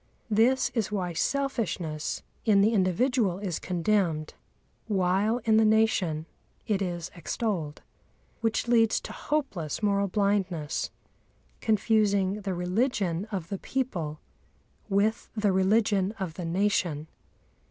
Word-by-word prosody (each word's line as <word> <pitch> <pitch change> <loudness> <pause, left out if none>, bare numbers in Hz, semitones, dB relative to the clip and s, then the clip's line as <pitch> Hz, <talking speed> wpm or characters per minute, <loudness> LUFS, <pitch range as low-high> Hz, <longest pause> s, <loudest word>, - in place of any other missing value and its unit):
This 235 +5 +3
is 220 -4 -1
why 185 -4 -2
selfishness 195 - -2 0.2
in 205 -3 +4
the 215 +3 +4
individual 200 +1 +2
is 190 -5 -3
condemned, 175 -4 0 0.5
while 195 +2 +2
in 220 -1 +4
the 220 - +5
nation 215 -8 +2 0.4
it 205 -3 0
is 175 -2 -3
extolled, 170 -4 -3 0.6
which 225 +1 0
leads 225 -2 +4
to - - -8
hopeless 215 - -2
moral 200 -1 +2
blindness, 190 -6 0 0.7
confusing 210 -2 +2
the 195 -2 -2
religion 185 0 0
of 185 -4 -4
the 195 - -3
people 170 - -3 0.7
with 210 +3 +1
the 210 -2 +2
religion 195 +1 +2
of 190 -7 -5
the 175 +1 -6
nation. 175 -4 0
200 Hz, 115 wpm, -28 LUFS, 180-220 Hz, 0.7 s, the